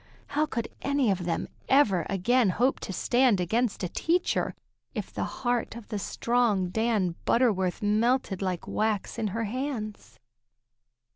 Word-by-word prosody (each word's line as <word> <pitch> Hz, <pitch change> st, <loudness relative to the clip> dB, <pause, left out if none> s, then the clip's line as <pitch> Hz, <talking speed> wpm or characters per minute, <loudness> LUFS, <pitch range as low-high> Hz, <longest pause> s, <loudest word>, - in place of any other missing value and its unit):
How 300 Hz, +2 st, +1 dB
could 235 Hz, -6 st, -3 dB
any 280 Hz, -5 st, +2 dB
of 180 Hz, -2 st, -2 dB
them 170 Hz, -, -1 dB, 0.2 s
ever 205 Hz, -, +4 dB
again 215 Hz, +4 st, +3 dB
hope 245 Hz, +8 st, +1 dB
to -, -, -5 dB
stand 240 Hz, +1 st, +3 dB
against 220 Hz, +5 st, 0 dB
a -, -, +1 dB
teacher, 345 Hz, -, 0 dB, 0.4 s
if -, -, -5 dB
the -, -, -2 dB
heart 245 Hz, -2 st, -2 dB
of 235 Hz, -3 st, -10 dB
the 210 Hz, -3 st, -2 dB
strong 225 Hz, -4 st, +1 dB
Dan 215 Hz, -3 st, +1 dB
Butterworth 210 Hz, -7 st, +2 dB
melted 215 Hz, -1 st, +1 dB
like 185 Hz, -3 st, -2 dB
wax 215 Hz, -2 st, -1 dB
in 220 Hz, -, 0 dB
her 225 Hz, +4 st, -2 dB
hands? 215 Hz, -, -4 dB
220 Hz, 145 wpm, -28 LUFS, 190-245 Hz, 0.4 s, ever